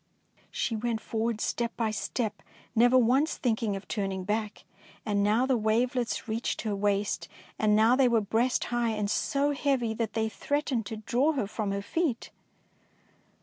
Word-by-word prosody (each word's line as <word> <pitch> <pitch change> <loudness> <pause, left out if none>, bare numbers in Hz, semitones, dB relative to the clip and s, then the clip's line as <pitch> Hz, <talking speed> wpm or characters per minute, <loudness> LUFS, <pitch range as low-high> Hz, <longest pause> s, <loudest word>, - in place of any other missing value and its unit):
She 225 - -2
went 225 0 -1
forward, 225 0 -2
step 235 +1 -2
by 225 -2 0
step, 215 +1 -3 0.3
never 245 +3 +5
once 260 +6 +3
thinking 225 -4 0
of 195 - -8
turning 195 -3 -2
back; 210 +1 -2 0.4
and 205 -1 +1
now 215 +5 +3
the 265 -1 +2
wavelets 235 +2 0
reached 225 +2 -2
her 215 -3 -1
waist, 205 0 0 0.3
and 210 -1 +3
now 220 +3 +5
they 265 -1 +4
were 235 -2 +3
breast 225 +5 +1
high 240 -1 +1
and 210 -1 -1
so 285 +1 +1
heavy 270 -5 0
that 220 -1 -3
they 220 -1 0
threatened 260 -2 -2
to 220 - -5
draw 250 +8 +1
her 260 -8 -1
from 210 0 -3
her 200 0 -2
feet. 290 - -2
225 Hz, 165 wpm, -28 LUFS, 210-245 Hz, 0.4 s, never